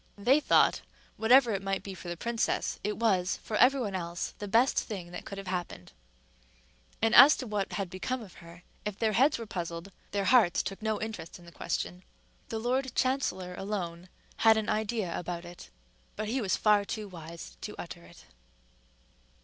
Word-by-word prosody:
They 250 +8 +4
thought, - - +4 0.3
whatever 245 +2 +5
it 195 - -2
might 195 0 -2
be 195 - -6
for 185 - -10
the 175 - -4
princess, 235 +4 -1
it 210 +1 -2
was, 195 -5 +1
for 215 - -4
every 260 +3 +5
one 205 -5 -3
else, 175 -2 -4
the 205 - -5
best 230 +6 +3
thing 185 -6 -6
that 180 - -7
could 200 - -7
have 195 - -7
happened; 180 - -5 1.1
and 225 0 +3
as 280 +5 +9
to 255 - -5
what 210 -3 -2
had 195 -2 -2
become 190 +8 -3
of 195 - -13
her, 170 +1 -14 0.2
if 210 -2 -4
their 220 -1 +1
heads 265 +7 +4
were 230 - -6
puzzled, 175 -1 -5 0.2
their 200 -1 -1
hearts 230 -8 +4
took 195 - -6
no 220 -1 -1
interest 215 -7 -6
in 175 - -16
the 170 - -13
question. 90 - -3 0.5
The 225 - -3
lord 255 +3 -1
chancellor 255 -9 0
alone 180 -3 -5 0.3
had 220 -1 +5
an 215 -1 -1
idea 215 -4 -1
about 175 0 -5
it, 175 0 -11 0.5
but 215 0 -3
he 250 +4 -1
was 195 -4 +1
far 210 -1 +4
too 210 +1 -5
wise 170 -2 -10
to - - -6
utter - - -8
it. - - -16
205 Hz, 190 wpm, -30 LUFS, 180-225 Hz, 1.1 s, as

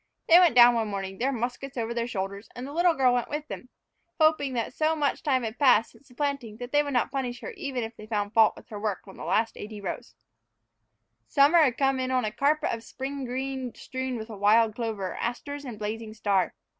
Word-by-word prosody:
They 340 +2 +8
went 345 -8 +5
down 240 0 +9
one 225 -2 0
morning, 195 -1 -5
their 265 +3 +1
muskets 250 +2 -4
over 230 0 -2
their 235 0 -2
shoulders, 200 -2 -5
and 245 - -6
the 285 - -8
little 345 +1 +3
girl 255 -2 +3
went 245 -1 -1
with 300 +1 -4
them, 255 - -8 0.5
hoping 310 -4 +3
that 235 0 -2
so 315 +2 +1
much 290 -2 0
time 260 -4 +1
had 225 0 -5
passed 250 -6 +4
since 280 - -22
the 245 - -19
planting 275 -6 -3
that 245 +1 -7
they 290 - +4
would 285 -1 -4
not 245 - +1
punish 250 -3 -3
her - - -6
even 275 - -4
if 225 +1 -6
they 215 - -11
found 205 -1 -2
fault 225 -1 +5
with - - -15
her 210 - -6
work 205 -2 -3
on 195 - -11
the - - -9
last 225 +1 +1
eighty 210 0 -7
rows. 195 -3 -6 1.1
Summer 290 +5 +5
had 260 -6 +3
come 270 -1 +2
in 255 0 -1
on 255 -2 +1
a 215 - -2
carpet 285 +7 +1
of 230 - -4
spring 270 +3 -6
green 260 0 -4
strewn 260 -1 -4
with 220 0 -7
wild 215 +1 +3
clover, 210 -6 -3
asters, 285 +4 -4
and 240 -5 -7
blazing 215 +1 -5
star. 200 -3 0
245 Hz, 230 wpm, -27 LUFS, 220-275 Hz, 1.1 s, down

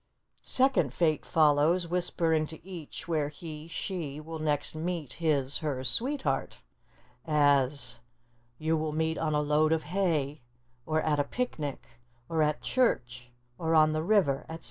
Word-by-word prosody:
Second 255 - +2
Fate 155 -3 +2
follows, 160 +2 +3
whispering 165 -3 +1
to 160 +3 -11
each 175 -5 -8
where 155 -4 0
he 155 0 -9
(she) 165 -4 -4
will 160 +1 -7
next 150 -2 0
meet 160 -2 -3
his 145 -5 0
(her) 145 -5 -2
sweetheart; 195 - 0 0.7
as, 140 -3 +2 0.6
"You 160 +3 0
will 155 -1 -2
meet 160 +1 0
on 155 -2 0
a 150 - +2
load 150 +1 +2
of 160 -1 +1
hay," 155 -5 -1 0.5
or, 155 0 +1
"at 150 -2 +1
a - - +4
picnic," 150 - -4 0.4
or, 160 -1 0
"at 150 0 +1
church," 125 - 0 0.3
or, 165 0 +1
"on 155 0 +5
the 155 - 0
river," 165 -7 +3
etc. 165 0 -6
155 Hz, 145 wpm, -29 LUFS, 145-165 Hz, 0.7 s, on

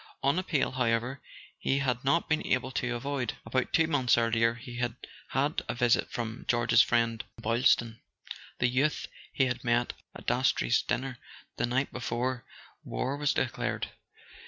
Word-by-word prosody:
One 140 +6 +2
appeal, 160 -6 0
however, 125 +1 0 0.4
he 135 - +1
had 125 -3 0
not 165 +5 +2
been 155 0 +1
able 130 0 +1
to 125 -1 -1
avoid. 130 -1 -2
About 125 +3 -1
two 160 - +4
months 135 -7 +3
earlier 115 0 +2
he 120 +1 -9
had 120 -1 -1 0.3
had 145 +3 0
a - - -1
visit 120 -1 +2
from 115 0 -5
George's 120 0 +5
friend 115 -2 +1 0.2
Boylston, 115 0 +2 0.6
the 125 - +3
youth 135 +5 +1 0.3
he 135 - +2
had 125 -1 -2
met 120 0 +1 0.2
at - - -10
Dastrey's - - +2
dinner 125 0 -3 0.4
the - - +1
night 130 +3 0
before 125 +1 -2 0.4
war 135 +2 -2
was 145 0 +1
declared. - - -1
125 Hz, 155 wpm, -29 LUFS, 120-135 Hz, 0.6 s, George's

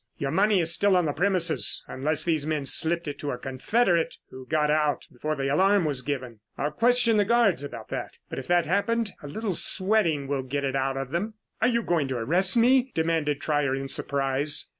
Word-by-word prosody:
Your 135 -1 -3
money 205 +2 +3
is 165 -1 +3
still 200 +1 +3
on 180 - +1
the 145 - -1
premises 170 - +1
unless 145 +3 -1
these 160 -4 0
men 150 -2 -2
slipped 170 +4 +1
it 145 - -5
to 145 - -4
a 125 - -3
confederate 170 - 0
who 130 0 -11
got 150 0 +1
out 150 -1 0
before 155 +5 -3
the 135 -1 -2
alarm 190 +6 +3
was 140 -4 -1
given. 130 -5 -5 0.2
I'll 150 +2 -2
question 230 +5 +3
the 205 - +4
guards 210 - +2
about 120 -6 -8
that. - - -6
If 135 - -6
that 175 -1 +2
happened, 210 +5 0
a 145 - -8
little 205 +6 -3
sweating 185 -5 +1
will 140 -1 -1
get 140 +2 -4
it 135 -1 -2
out 135 0 -1
of 135 -1 -5
them." 210 +7 -3 0.3
"Are 225 - +4
you 235 -1 +1
going 165 -7 0
to 130 -2 -3
arrest 180 - +2
me?" 255 +2 +3
demanded 160 -3 0
Trier 145 -3 0
in 135 0 -4
surprise. 140 +2 0
155 Hz, 205 wpm, -26 LUFS, 140-195 Hz, 0.3 s, the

